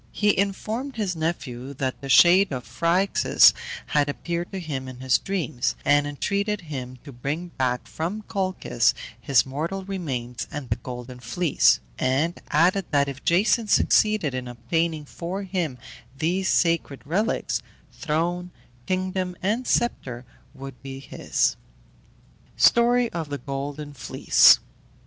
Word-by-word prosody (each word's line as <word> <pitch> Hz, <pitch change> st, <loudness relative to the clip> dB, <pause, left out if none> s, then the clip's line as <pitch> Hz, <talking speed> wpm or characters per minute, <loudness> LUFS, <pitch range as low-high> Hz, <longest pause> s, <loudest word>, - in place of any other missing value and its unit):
He 210 Hz, -1 st, +2 dB
informed 215 Hz, +7 st, -2 dB
his 200 Hz, -5 st, -2 dB
nephew 140 Hz, -5 st, -4 dB
that 130 Hz, -1 st, -3 dB
the 135 Hz, -, -7 dB
shade 180 Hz, +6 st, +6 dB
of 125 Hz, -3 st, -4 dB
Phryxus 180 Hz, +4 st, +4 dB, 0.3 s
had 145 Hz, -1 st, +1 dB
appeared 170 Hz, +4 st, -4 dB
to 195 Hz, -, -4 dB
him 140 Hz, -6 st, -5 dB
in 130 Hz, -1 st, -9 dB
his 130 Hz, 0 st, +2 dB
dreams, 160 Hz, -10 st, -2 dB
and 145 Hz, 0 st, +4 dB
entreated 200 Hz, +8 st, -1 dB
him 130 Hz, -6 st, -7 dB
to 145 Hz, -, -10 dB
bring 145 Hz, +8 st, -4 dB
back 130 Hz, -5 st, -1 dB
from 185 Hz, +7 st, -4 dB
Colchis 185 Hz, -, 0 dB, 0.2 s
his 130 Hz, +1 st, +3 dB
mortal 165 Hz, +8 st, -4 dB
remains 130 Hz, -11 st, -4 dB
and 135 Hz, -6 st, -7 dB
the 110 Hz, -, +1 dB
Golden 125 Hz, +1 st, -8 dB
Fleece; 155 Hz, +7 st, +2 dB, 0.2 s
and 140 Hz, +7 st, 0 dB
added 180 Hz, +5 st, +3 dB
that 140 Hz, -1 st, +2 dB
if 135 Hz, 0 st, -8 dB
Jason 215 Hz, +6 st, +2 dB
succeeded 210 Hz, -6 st, +3 dB
in 130 Hz, -1 st, -4 dB
obtaining 150 Hz, +7 st, -2 dB
for 180 Hz, +7 st, -5 dB
him 175 Hz, -8 st, -2 dB, 0.4 s
these 180 Hz, +6 st, 0 dB
sacred 165 Hz, -5 st, +1 dB
relics, 195 Hz, +10 st, -1 dB, 0.3 s
throne, 175 Hz, +3 st, -2 dB, 0.4 s
kingdom, 185 Hz, -1 st, -1 dB
and 225 Hz, +6 st, 0 dB
sceptre 125 Hz, -, -1 dB, 0.3 s
should 135 Hz, -1 st, -9 dB
be 135 Hz, -1 st, -7 dB
his. 135 Hz, -, -1 dB, 1.0 s
STORY 240 Hz, 0 st, +4 dB
OF 165 Hz, -4 st, -4 dB
THE 145 Hz, -, -3 dB
GOLDEN 140 Hz, +2 st, -5 dB
FLEECE. 135 Hz, -, +5 dB
160 Hz, 135 wpm, -24 LUFS, 135-190 Hz, 1.0 s, shade